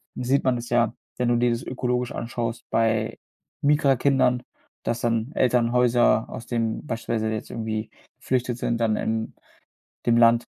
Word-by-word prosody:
sieht 130 Hz, +2 st, +1 dB
man 130 Hz, -2 st, +2 dB
es 120 Hz, 0 st, -6 dB
ja, 120 Hz, -1 st, +2 dB, 0.2 s
wenn 125 Hz, -1 st, +1 dB
du 120 Hz, -, +3 dB
dir 120 Hz, 0 st, +2 dB
das 115 Hz, +1 st, -2 dB
ökologisch 125 Hz, -1 st, -2 dB
anschaust 115 Hz, 0 st, -4 dB
bei 110 Hz, -1 st, +1 dB, 0.5 s
Migrantenkindern, 135 Hz, -3 st, +3 dB, 0.4 s
dass 115 Hz, -, -1 dB
dann 115 Hz, +2 st, 0 dB
Elternhäuser 120 Hz, -1 st, +3 dB
aus -, -, -8 dB
dem 115 Hz, +2 st, -2 dB
beispielsweise 115 Hz, -2 st, -2 dB
jetzt 110 Hz, -, -5 dB
irgendwie 110 Hz, -1 st, -3 dB, 0.3 s
geflüchtet 125 Hz, -2 st, -1 dB
sind 120 Hz, -1 st, -1 dB
dann 110 Hz, -2 st, +1 dB
in 110 Hz, 0 st, -2 dB, 0.7 s
dem 120 Hz, -1 st, +4 dB
Land, 115 Hz, 0 st, +5 dB
120 Hz, 145 wpm, -24 LUFS, 115-125 Hz, 0.7 s, Land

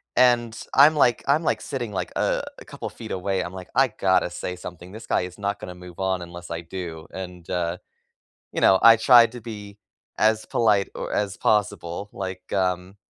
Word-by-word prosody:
And 120 Hz, -2 st, +3 dB, 0.2 s
I'm 150 Hz, +3 st, +7 dB
like 120 Hz, -5 st, +3 dB
I'm 150 Hz, +4 st, +3 dB
like, -, -, 0 dB
sitting, 120 Hz, -6 st, -4 dB
like, 90 Hz, -2 st, -3 dB
uh, -, -, +1 dB, 0.2 s
a -, -, -12 dB
couple -, -, -7 dB
feet -, -, -10 dB
away. 95 Hz, 0 st, -1 dB
I'm 90 Hz, +1 st, -7 dB
like, 95 Hz, -1 st, -9 dB
"I 135 Hz, +1 st, +5 dB
gotta 95 Hz, -3 st, +1 dB
say 90 Hz, -, -5 dB
something. 90 Hz, 0 st, -10 dB
This 110 Hz, +1 st, -9 dB
guy -, -, +2 dB
is 90 Hz, +1 st, -7 dB
not 100 Hz, 0 st, -2 dB
gonna 90 Hz, -, -8 dB
move 90 Hz, 0 st, -12 dB
on 95 Hz, -1 st, 0 dB
unless 85 Hz, 0 st, -10 dB
I 85 Hz, -, -3 dB
do." 85 Hz, -2 st, -7 dB
And, 90 Hz, -2 st, -8 dB
uh, 90 Hz, 0 st, -1 dB, 0.8 s
you -, -, -2 dB
know, 95 Hz, -, +6 dB
I 115 Hz, 0 st, +9 dB
tried 115 Hz, 0 st, +6 dB
to 125 Hz, -, -8 dB
be 105 Hz, -2 st, -9 dB, 0.4 s
as 110 Hz, 0 st, +2 dB
polite 105 Hz, -4 st, +2 dB
or -, -, -5 dB
as 100 Hz, -2 st, -1 dB
possible. 100 Hz, -3 st, 0 dB
Like, 95 Hz, -1 st, -6 dB
um 90 Hz, 0 st, -1 dB
95 Hz, 195 wpm, -24 LUFS, 90-110 Hz, 0.8 s, I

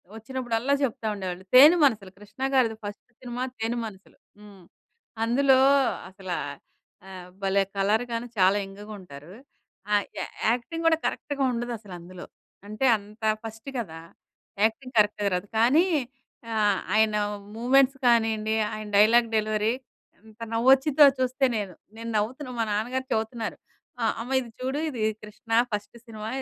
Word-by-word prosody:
వచ్చినప్పుడల్లా 240 Hz, +2 st, -2 dB
చెప్తా 230 Hz, -4 st, -2 dB
ఉండేవాళ్ళు. 185 Hz, -2 st, -5 dB
తేనె 295 Hz, +7 st, +9 dB
మనసులు 215 Hz, -9 st, +2 dB
'కృష్ణ' 210 Hz, +6 st, -5 dB
గారిది 235 Hz, -4 st, +2 dB
ఫస్ట్ 205 Hz, 0 st, -8 dB
సినిమా 245 Hz, 0 st, -4 dB
'తేనె 225 Hz, +2 st, -2 dB
మనసులు'. 195 Hz, -3 st, -12 dB, 0.2 s
హ్మ్. 205 Hz, -3 st, -15 dB, 0.6 s
అందులో 260 Hz, +3 st, +4 dB, 0.5 s
అసలా 190 Hz, -2 st, -5 dB, 0.7 s
ఆహ్, 185 Hz, -2 st, -9 dB
భలే! 195 Hz, 0 st, +2 dB
కలర్ 210 Hz, +4 st, +2 dB
గాను 230 Hz, +1 st, -3 dB
చాలా 190 Hz, +1 st, +4 dB
యంగ్‌గుంటారు. 195 Hz, -6 st, -11 dB, 0.6 s
ఆహ్, 205 Hz, -1 st, +3 dB
యా -, -, -2 dB, 0.3 s
యాక్టింగ్ 330 Hz, +8 st, -3 dB
కూడా 325 Hz, -1 st, +4 dB
కరెక్ట్‌‌గా 280 Hz, -1 st, -2 dB
ఉండదసలందులో 200 Hz, -7 st, -7 dB, 0.4 s
అంటే 215 Hz, +5 st, -2 dB
అంత 210 Hz, +2 st, -16 dB, 0.2 s
ఫస్ట్ 225 Hz, +3 st, -8 dB
కదా! 165 Hz, -8 st, -6 dB, 0.6 s
యాక్టింగ్ 255 Hz, +4 st, 0 dB
కరెక్ట్‌గా 205 Hz, -1 st, +2 dB
రాదు. 180 Hz, +3 st, -4 dB
కానీ 270 Hz, +10 st, +5 dB, 0.7 s
ఆహ్, 210 Hz, -3 st, +2 dB
ఆయన 215 Hz, 0 st, +3 dB, 0.4 s
మూమెంట్స్ 270 Hz, +3 st, +3 dB
కానీయండి 220 Hz, -2 st, +2 dB, 0.2 s
ఆయన 215 Hz, 0 st, -6 dB
డైలాగ్ 230 Hz, +3 st, +5 dB
డెలివరీ 215 Hz, +1 st, 0 dB, 0.5 s
ఎంత 220 Hz, +1 st, -19 dB
నవ్వొచ్చిద్దో 265 Hz, +5 st, +5 dB
చూస్తే 260 Hz, +1 st, +1 dB
నేను. 200 Hz, -3 st, -4 dB, 0.2 s
నేను 230 Hz, 0 st, -6 dB
నవ్వుతున్నా 255 Hz, +6 st, -3 dB
మా -, -, +3 dB
నాన్నగారు 245 Hz, +5 st, -2 dB
చెవుతున్నారు. 225 Hz, 0 st, -3 dB, 0.4 s
ఆహ్, 225 Hz, -, +2 dB
అమ్మ 245 Hz, +3 st, -7 dB
ఇది 245 Hz, -2 st, -7 dB
చూడు 265 Hz, +3 st, -2 dB
ఇది 250 Hz, -6 st, -5 dB, 0.2 s
'కృష్ణ' 225 Hz, +2 st, -3 dB
ఫస్ట్ 210 Hz, +2 st, -4 dB
సినిమా 215 Hz, -2 st, -8 dB
220 Hz, 130 wpm, -26 LUFS, 205-250 Hz, 0.7 s, తేనె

